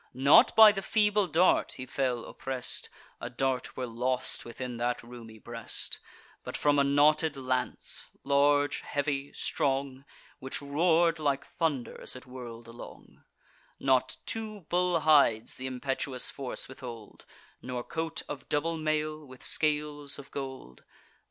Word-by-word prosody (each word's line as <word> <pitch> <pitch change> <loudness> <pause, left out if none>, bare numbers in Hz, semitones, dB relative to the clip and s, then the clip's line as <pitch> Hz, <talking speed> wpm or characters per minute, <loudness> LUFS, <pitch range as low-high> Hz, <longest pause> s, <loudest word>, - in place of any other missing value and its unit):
Not 140 - +6
by 220 -1 +10
the 195 -1 -3
feeble 210 -1 +2
dart 175 +3 +3
he 130 - -7
fell 125 -2 -1
oppress'd 130 -2 -3 0.3
(A 120 - -5
dart 130 +1 -2
were 130 - -2
lost 125 +2 -2
within 120 +1 -6
that 120 +1 -1
roomy 115 -2 -11
breast), 115 +1 -6 0.4
But - - -5
from 145 -1 +3
a - - +5
knotted 145 +2 +3
lance, 130 -1 -1 0.2
large, 145 +1 +3
heavy, 145 -1 -2
strong, 135 -1 -1 0.4
Which 130 - -3
roar'd 165 +3 +2
like 140 -2 0
thunder 150 -7 -2
as - - -3
it 130 - -10
whirl'd 120 -2 -9
along: 115 +1 -12 0.6
Not 130 -1 +2
two 215 -2 -5
bull 180 -1 +2
hides 140 -8 +4
th' 130 - -5
impetuous 130 0 -2
force 135 -3 -3
withhold, 120 -4 -10 0.3
Nor 125 -1 -4
coat 160 +2 -4
of 145 - -7
double 165 +3 0
mail, 155 0 -1
with 130 -3 -13
scales 150 -2 0
of 140 -1 -11
gold. 130 - -7
140 Hz, 140 wpm, -29 LUFS, 125-155 Hz, 0.6 s, by